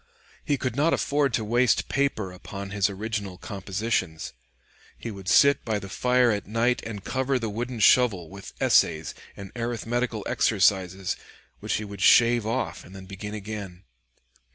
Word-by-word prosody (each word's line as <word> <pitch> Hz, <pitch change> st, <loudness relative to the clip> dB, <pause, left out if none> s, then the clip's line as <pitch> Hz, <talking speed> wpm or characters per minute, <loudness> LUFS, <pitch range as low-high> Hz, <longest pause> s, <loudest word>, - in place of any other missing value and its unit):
He 145 Hz, -, 0 dB
could 130 Hz, -3 st, -3 dB
not 150 Hz, +4 st, +3 dB
afford 145 Hz, -1 st, +1 dB
to 110 Hz, -, -2 dB
waste 120 Hz, +2 st, +2 dB
paper 135 Hz, -9 st, -1 dB
upon 100 Hz, +2 st, -8 dB
his 100 Hz, -1 st, +1 dB
original 100 Hz, -2 st, -4 dB
compositions. 95 Hz, -2 st, -3 dB, 0.6 s
He 115 Hz, -, -6 dB
would 95 Hz, -2 st, -10 dB
sit 140 Hz, +7 st, +5 dB
by 110 Hz, -3 st, -1 dB
the 95 Hz, -1 st, -7 dB
fire 125 Hz, +3 st, +2 dB
at 105 Hz, -1 st, -3 dB
night 115 Hz, +3 st, +1 dB
and 105 Hz, -4 st, -7 dB
cover 130 Hz, +3 st, 0 dB
the 115 Hz, -3 st, -3 dB
wooden 120 Hz, +3 st, -4 dB
shovel 105 Hz, -7 st, +4 dB
with 100 Hz, +3 st, -11 dB
essays 80 Hz, 0 st, +2 dB, 0.2 s
and 100 Hz, -1 st, -9 dB
arithmetical 120 Hz, -1 st, -2 dB
exercises, 95 Hz, -3 st, +1 dB, 0.4 s
which -, -, -2 dB
he 105 Hz, -, -3 dB
would 100 Hz, -2 st, -9 dB
shave 120 Hz, +1 st, +5 dB
off 125 Hz, +4 st, -2 dB
and 95 Hz, -, -14 dB
then 95 Hz, -1 st, -10 dB
begin 100 Hz, +2 st, -7 dB
again. 100 Hz, -3 st, -7 dB
105 Hz, 155 wpm, -26 LUFS, 95-120 Hz, 0.6 s, sit